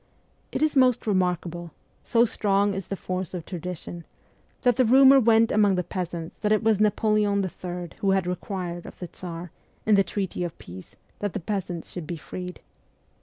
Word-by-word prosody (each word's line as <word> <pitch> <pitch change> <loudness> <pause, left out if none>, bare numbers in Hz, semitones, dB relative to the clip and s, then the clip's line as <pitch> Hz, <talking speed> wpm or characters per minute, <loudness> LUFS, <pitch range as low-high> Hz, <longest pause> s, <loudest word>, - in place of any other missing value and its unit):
It - - -1
is 310 -1 +2
most 255 -3 +4
remarkable 180 -4 -1 0.3
so 235 0 +3
strong 205 -3 +1
is 190 -1 -5
the 195 - -3
force 185 -1 -4
of 170 -3 -6
tradition 175 -1 -6 0.6
that 245 -2 +4
the 255 - +4
rumour 270 +3 +7
went 225 -1 +4
among 205 -2 +4
the 180 - 0
peasants 170 -2 -5
that 210 - +1
it 215 +1 +3
was 220 -2 +3
Napoleon 210 -1 +2
III. 175 -1 -6
who 195 - +1
had 190 -1 +2
required 180 -1 -4
of - - -11
the 180 - -6
Tsar, 170 -1 -8 0.3
in 215 - +4
the 200 -1 +6
treaty 190 -1 -3
of 175 -2 -5
peace, 90 +1 -11 0.2
that 205 -2 -2
the - - -2
peasants 180 -2 -4
should 175 -4 -6
be 170 - -4
freed. 180 +3 -7
190 Hz, 180 wpm, -26 LUFS, 175-215 Hz, 0.6 s, rumour